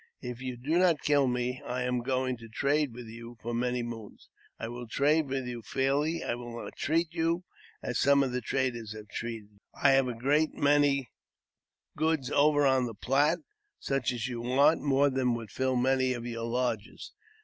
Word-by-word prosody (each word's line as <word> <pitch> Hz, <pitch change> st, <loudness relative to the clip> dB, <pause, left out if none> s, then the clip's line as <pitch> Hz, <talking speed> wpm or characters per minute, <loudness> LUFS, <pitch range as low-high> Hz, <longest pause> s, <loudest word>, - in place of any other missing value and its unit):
If 125 Hz, 0 st, -6 dB
you 130 Hz, -1 st, -4 dB
do 150 Hz, +8 st, +1 dB
not 175 Hz, -5 st, +3 dB
kill 145 Hz, -2 st, +3 dB
me, 125 Hz, +1 st, -1 dB
I 125 Hz, +1 st, -2 dB
am 125 Hz, -1 st, 0 dB
going 130 Hz, 0 st, 0 dB
to 115 Hz, 0 st, -12 dB
trade 145 Hz, +4 st, +1 dB
with 120 Hz, +1 st, -9 dB
you 115 Hz, +1 st, -10 dB
for 120 Hz, +2 st, -4 dB
many 125 Hz, +1 st, 0 dB
moons. 115 Hz, -3 st, -9 dB, 0.3 s
I -, -, -4 dB
will 120 Hz, +1 st, -7 dB
trade 145 Hz, +6 st, +2 dB
with 135 Hz, -1 st, -2 dB
you 120 Hz, -1 st, -5 dB
fairly; 140 Hz, +7 st, 0 dB
I -, -, -1 dB
will 120 Hz, -1 st, -6 dB
not -, -, -9 dB
cheat 165 Hz, +1 st, 0 dB
you, 165 Hz, +1 st, 0 dB, 0.4 s
as 125 Hz, -, -2 dB
some 140 Hz, 0 st, +5 dB, 0.2 s
traders 120 Hz, -3 st, -2 dB
have 105 Hz, -1 st, -10 dB
cheated 110 Hz, -1 st, -5 dB
you. 105 Hz, -, -26 dB, 0.2 s
I 140 Hz, -, +5 dB
have 135 Hz, -1 st, +4 dB
a 125 Hz, -, -3 dB
great 145 Hz, +6 st, +1 dB
many 140 Hz, -2 st, +3 dB, 0.8 s
goods 155 Hz, -4 st, 0 dB
over 145 Hz, 0 st, +4 dB
on 130 Hz, -2 st, +3 dB
the 115 Hz, -, -7 dB
Platte, 145 Hz, +9 st, +2 dB, 0.3 s
such 135 Hz, -3 st, -1 dB
as 120 Hz, -2 st, -3 dB
you 120 Hz, -2 st, -4 dB
want, 140 Hz, +6 st, +4 dB
more 140 Hz, 0 st, +3 dB
than 130 Hz, -2 st, +1 dB
would 115 Hz, -3 st, -7 dB
fill 130 Hz, 0 st, 0 dB
many 130 Hz, +1 st, +2 dB
of 120 Hz, -1 st, -6 dB
your 115 Hz, -1 st, -4 dB
lodges. 115 Hz, -2 st, -3 dB
130 Hz, 190 wpm, -29 LUFS, 120-140 Hz, 0.8 s, some